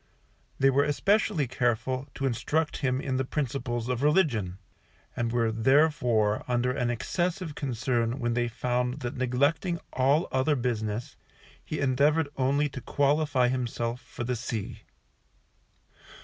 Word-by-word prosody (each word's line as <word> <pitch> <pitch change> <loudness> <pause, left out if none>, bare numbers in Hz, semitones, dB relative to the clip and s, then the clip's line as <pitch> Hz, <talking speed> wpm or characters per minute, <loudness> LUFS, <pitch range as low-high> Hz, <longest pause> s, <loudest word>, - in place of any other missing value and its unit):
They 135 0 +4
were 140 +2 +3
especially 150 0 +1
careful 125 +2 -1
to 135 - -2
instruct 140 +6 0
him 130 -2 0
in 130 -1 -2
the 130 - +1
principles 125 -4 -2
of 125 -1 -1
religion, 140 - +2 0.6
and 115 -1 -1
were 115 -2 +1
therefore 120 -3 +2
under 125 0 +1
an 125 -2 -1
excessive 175 - -2
concern 120 -3 -1
when 120 -2 -1
they 120 0 +1
found 125 +3 -1
that 120 0 -4
neglecting 140 +8 +1
all 140 +6 +2
other 130 +3 +2
business, 115 -3 -2 0.5
he 155 - -4
endeavoured 145 +3 +2
only 140 +3 +2
to 130 - -7
qualify 145 -3 +2
himself 120 -1 -2
for - - -7
the 125 +1 -1
sea. 110 -3 -5
130 Hz, 135 wpm, -28 LUFS, 120-145 Hz, 0.6 s, They